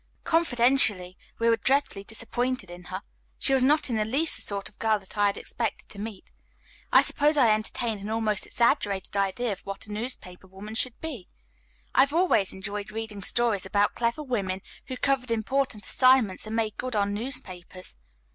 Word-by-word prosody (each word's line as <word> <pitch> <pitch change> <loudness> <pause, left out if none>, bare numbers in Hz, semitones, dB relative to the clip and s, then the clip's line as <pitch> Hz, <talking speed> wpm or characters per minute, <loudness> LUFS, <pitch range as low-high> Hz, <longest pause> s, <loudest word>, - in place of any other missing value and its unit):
Confidentially, 245 - +3 0.2
we 230 - +1
were 230 0 +4
dreadfully 265 -4 +1
disappointed 230 -1 -3
in 175 0 -11
her. 185 +2 -6 0.3
She 270 - +2
was 265 - +4
not 295 +4 +3
in 235 -4 -1
the 215 - +2
least 275 +9 +2
the - - -2
sort 200 -1 -2
of 205 - -14
girl 220 -1 +2
that 195 -2 -14
I 205 -1 +3
had 200 - -1
expected 230 -3 -3
to 200 - -10
meet. 210 -2 -7 0.6
I - - +7
suppose 300 +1 +2
I 235 -6 +6
entertained 215 0 -2
an 205 - -5
almost 220 -2 0
exaggerated 200 -5 +1
idea 200 +4 0
of 195 - -4
what 195 0 -6
a 210 - -11
newspaper 210 -5 -5
woman 195 +3 -9
should 240 +2 0
be. 275 - -6 0.7
I've 275 +2 +4
always 335 - +3
enjoyed 200 +1 -6
reading 220 -2 -6
stories 225 0 +2
about 205 +1 +2
clever 235 +6 -1
women 195 -8 -2 0.2
who 255 - -5
covered 265 -1 0
important 230 0 -1
assignments 255 -7 +3
and 220 - -4
made 220 -2 -1
good 255 -2 -4
on 200 -1 +1
newspapers. 185 - -5
220 Hz, 180 wpm, -27 LUFS, 200-255 Hz, 0.7 s, I